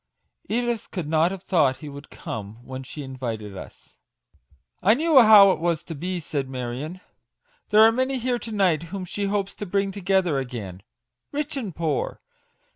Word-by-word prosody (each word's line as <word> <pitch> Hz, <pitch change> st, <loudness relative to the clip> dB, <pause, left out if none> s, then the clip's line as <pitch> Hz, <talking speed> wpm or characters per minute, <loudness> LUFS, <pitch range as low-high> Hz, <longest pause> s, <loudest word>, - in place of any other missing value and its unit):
" -, -, -57 dB
Edith 235 Hz, 0 st, -1 dB
could 180 Hz, -6 st, -4 dB
not 160 Hz, +2 st, +3 dB
have 190 Hz, 0 st, -7 dB
thought 145 Hz, -8 st, +2 dB
he 150 Hz, -, -9 dB
would 140 Hz, 0 st, -10 dB
come 110 Hz, +2 st, -7 dB
when 130 Hz, 0 st, -6 dB
she 145 Hz, +3 st, -8 dB
invited 115 Hz, -6 st, -5 dB
us." -, -, -12 dB, 0.5 s
" 65 Hz, +2 st, -36 dB
I 215 Hz, +4 st, +5 dB
knew 310 Hz, -1 st, +6 dB
how 210 Hz, -3 st, +9 dB
it -, -, -1 dB
was 170 Hz, -1 st, 0 dB
to 165 Hz, -, -7 dB
be/' 180 Hz, +4 st, -3 dB
said 145 Hz, -4 st, -3 dB
Marion; 130 Hz, +8 st, -5 dB, 0.7 s
"there 215 Hz, +1 st, +6 dB
are 225 Hz, -, +7 dB
many 260 Hz, +3 st, 0 dB
here 245 Hz, 0 st, -1 dB
to 230 Hz, -, -7 dB
night 190 Hz, -7 st, +2 dB
whom 190 Hz, 0 st, -5 dB
she 200 Hz, +3 st, -3 dB
hopes 200 Hz, -1 st, -1 dB
to 205 Hz, -, -5 dB
bring 195 Hz, +1 st, 0 dB
together 190 Hz, -6 st, +1 dB
again; 110 Hz, -8 st, -6 dB, 0.5 s
rich 295 Hz, +1 st, -2 dB
and 215 Hz, -, -4 dB
poor. 155 Hz, -5 st, -2 dB
175 Hz, 185 wpm, -24 LUFS, 135-205 Hz, 0.7 s, how